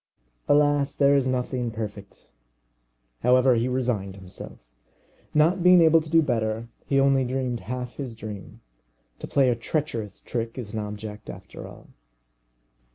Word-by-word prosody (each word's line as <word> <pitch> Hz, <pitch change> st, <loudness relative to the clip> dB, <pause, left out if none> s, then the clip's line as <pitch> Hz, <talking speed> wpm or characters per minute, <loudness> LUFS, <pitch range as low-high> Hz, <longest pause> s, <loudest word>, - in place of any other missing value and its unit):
Alas, 145 Hz, -1 st, +3 dB
there 140 Hz, 0 st, +4 dB
is 135 Hz, -2 st, +2 dB
nothing 125 Hz, -1 st, -1 dB
perfect! 105 Hz, -3 st, -8 dB, 0.9 s
However, 125 Hz, +1 st, +5 dB
he 120 Hz, +1 st, +1 dB
resigned 120 Hz, -7 st, -1 dB
himself. 95 Hz, -1 st, -9 dB, 0.7 s
Not 165 Hz, +5 st, +3 dB
being 180 Hz, 0 st, +7 dB
able 165 Hz, 0 st, +6 dB
to 155 Hz, -, -10 dB
do 165 Hz, 0 st, +5 dB
better, 115 Hz, -3 st, -1 dB, 0.2 s
he 135 Hz, -, +2 dB
only 135 Hz, -1 st, +4 dB
dreamed 125 Hz, -1 st, -2 dB
half 125 Hz, +5 st, -6 dB
his 130 Hz, -5 st, -5 dB
dream. 105 Hz, -3 st, -9 dB, 0.6 s
To -, -, -6 dB
play 135 Hz, -3 st, +3 dB
a -, -, +1 dB
treacherous 115 Hz, -, -3 dB
trick 115 Hz, 0 st, -4 dB
is 115 Hz, -4 st, -6 dB
an 110 Hz, -, -2 dB
object 105 Hz, 0 st, -7 dB
after -, -, -9 dB
all. -, -, -14 dB
125 Hz, 145 wpm, -25 LUFS, 110-140 Hz, 0.9 s, being